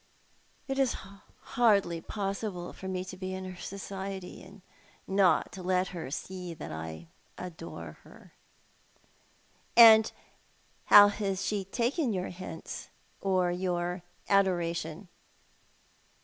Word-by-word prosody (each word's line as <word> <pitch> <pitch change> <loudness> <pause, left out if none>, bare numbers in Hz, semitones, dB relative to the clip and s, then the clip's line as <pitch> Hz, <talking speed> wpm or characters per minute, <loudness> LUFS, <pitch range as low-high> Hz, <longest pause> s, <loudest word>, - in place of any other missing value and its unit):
It 270 0 -2
has 265 -3 +2
been 195 +1 -12 0.2
hardly 200 -8 +2
possible 195 -2 -4
for 190 - -8
me 185 -1 -3
to 185 - -8
be 185 0 -5
in 190 0 -6
her 185 0 -7
society, 195 -1 -6
and 190 +1 -15 0.4
not 190 -2 +2
let 185 0 +1
her 170 -8 -6
see 180 +3 -6
that 155 - -8
I 80 +1 -7 0.3
adore 160 - -8
her." - - -17 1.4
"And 220 -2 +9 0.7
how 205 0 +9
has 200 -2 -2
she 205 -2 -1
taken 245 - 0
your 185 -1 -2
hints, 185 +1 -8 0.3
or 185 -2 +2
your 180 0 -2 0.3
adoration 175 -3 +1
185 Hz, 115 wpm, -30 LUFS, 175-200 Hz, 1.4 s, And